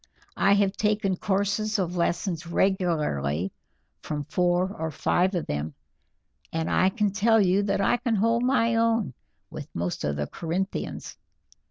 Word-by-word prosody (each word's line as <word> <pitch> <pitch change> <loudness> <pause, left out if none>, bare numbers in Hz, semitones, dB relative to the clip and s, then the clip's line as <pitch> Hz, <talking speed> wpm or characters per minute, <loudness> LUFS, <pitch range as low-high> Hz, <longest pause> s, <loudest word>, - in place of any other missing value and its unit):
I 200 - +4
have 200 -1 +3
taken 210 -3 +1
courses 205 +3 0
of 180 -2 -2
lessons 170 -1 -1
regularly 150 - 0 0.5
from 150 -1 -4
four 180 +4 +1
or 160 0 -3
five 180 +5 +1
of 170 - -1
them, 75 +1 -4 0.8
and 160 0 -2
I 185 - +4
can 210 0 0
tell 225 +3 +3
you 195 0 +3
that 200 -1 0
I 220 - +3
can 240 -2 -1
hold 230 +3 +2
my 230 -3 +2
own 225 - +1 0.4
with - - -7
most 85 +1 -3
of 75 -1 -1
the 75 0 -2
Corinthians. 175 - -4
190 Hz, 150 wpm, -26 LUFS, 160-210 Hz, 0.8 s, I